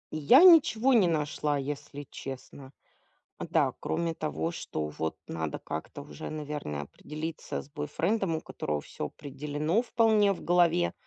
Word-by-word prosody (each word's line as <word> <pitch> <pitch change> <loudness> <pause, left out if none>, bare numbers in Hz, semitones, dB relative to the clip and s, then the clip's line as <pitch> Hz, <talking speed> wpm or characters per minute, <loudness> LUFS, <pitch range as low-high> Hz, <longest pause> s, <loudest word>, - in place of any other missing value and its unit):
Я 200 - +7
ничего 270 -8 +7
не 210 -7 +5
нашла, 150 -2 0
если 145 +1 -5
честно. 135 0 -8 0.7
Да, - - +1
кроме 170 -1 -1
того, 80 - -2
что 75 -2 -4
вот 80 +1 -4
надо 80 -2 -4
как-то - - -6
уже, 75 0 -8
наверное, 150 - -4
определиться 155 - -6
с - - -17
бойфрендом, 165 +5 -1
у 160 - -6
которого 75 -1 -3
всё 75 - -6
определено 150 - -2
вполне 220 -4 +3
в 195 - -4
голове. 170 - +3
150 Hz, 135 wpm, -29 LUFS, 130-175 Hz, 0.7 s, Я